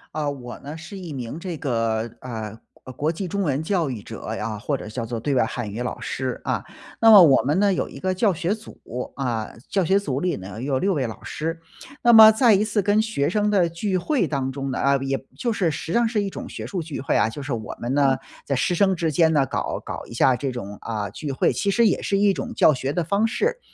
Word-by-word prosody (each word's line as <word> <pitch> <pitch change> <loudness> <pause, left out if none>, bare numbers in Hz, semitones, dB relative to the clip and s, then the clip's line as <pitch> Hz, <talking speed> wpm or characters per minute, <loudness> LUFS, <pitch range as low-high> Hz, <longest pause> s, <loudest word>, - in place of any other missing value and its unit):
啊， 150 -2 -1
我 130 -4 -7
呢 145 +3 -8
是 160 +5 -9
一 180 -4 -7
名 130 0 -5
这 170 -2 -5
个， 115 -4 -1
呃， 110 -3 -6 0.3
国 130 - -8
国 150 +5 0
际 185 +3 -4
中 200 +4 -2
文 145 -6 0
教 165 -2 0
育 120 -5 -5
者 - - -9
啊， 110 -2 -3
或 135 +7 -2
者 - - -8
叫 115 +2 -4
做 115 0 -4
对 140 +4 -1
外 125 - +4
汉 120 -2 -4
语 110 +4 -4
老 125 - -4
师， 130 -2 -3
啊。 - - -1 0.4
那 225 0 +8
么 205 -3 +11
我 145 -6 +6
们 150 +7 +1
呢 200 -1 +3
有 - - -2
一 - - -10
个 185 0 0
教 195 +1 +2
学 175 +5 -1
组， 220 - -14 0.4
啊， 120 -5 -2 0.2
教 195 - +1
学 190 +4 +3
组 140 -8 -3
里 180 -3 0
呢 100 +4 -8
有 135 -1 0
6 195 +5 +1
位 140 -6 0
老 110 - -7
师。 165 +2 -4 0.4
那 240 0 +5
么 220 -1 +11
在 225 +1 +5
一 200 +1 +3
次 215 -1 0
跟 205 +2 +3
学 220 -11 -1
生 210 +3 +1
的 185 -4 +3
聚 185 +3 -2
会 240 - +1
当 135 -4 -2
中 135 0 -4
呢， - - -3
呃， 140 0 +3
也 135 0 -1 0.2
就 240 -2 -1
是 185 -6 +1
实 155 - -5
际 165 - -2
上 235 -1 +3
是 220 -2 0
一 200 - -2
种 - - -7
学 - - -7
术 185 -4 -3
聚 155 -2 -6
会 140 - +1
啊， 105 - +3
就 145 - -7
是 140 - -5
我 110 -3 -4
们 120 +2 -2
呢 140 -2 +4 0.3
在 140 - 0
师 130 - +1
生 190 +2 +3
之 165 -2 -1
间 160 +1 +3
呢 140 -3 +3
搞 - - -3
搞 - - -6
一 - - -11
下 130 - +4
这 140 - -2
种， 105 -5 -6
啊， 105 -3 -4
聚 150 - -6
会， - - +2
其 200 - -1
实 230 +4 +3
也 - - +1
是 200 - 0
一 200 0 +4
种 - - -5
教 155 - +5
学 135 +1 -3
的 175 - 0
方 200 +7 +1
式。 475 - -1
155 Hz, 280 characters per minute, -23 LUFS, 130-195 Hz, 0.4 s, 么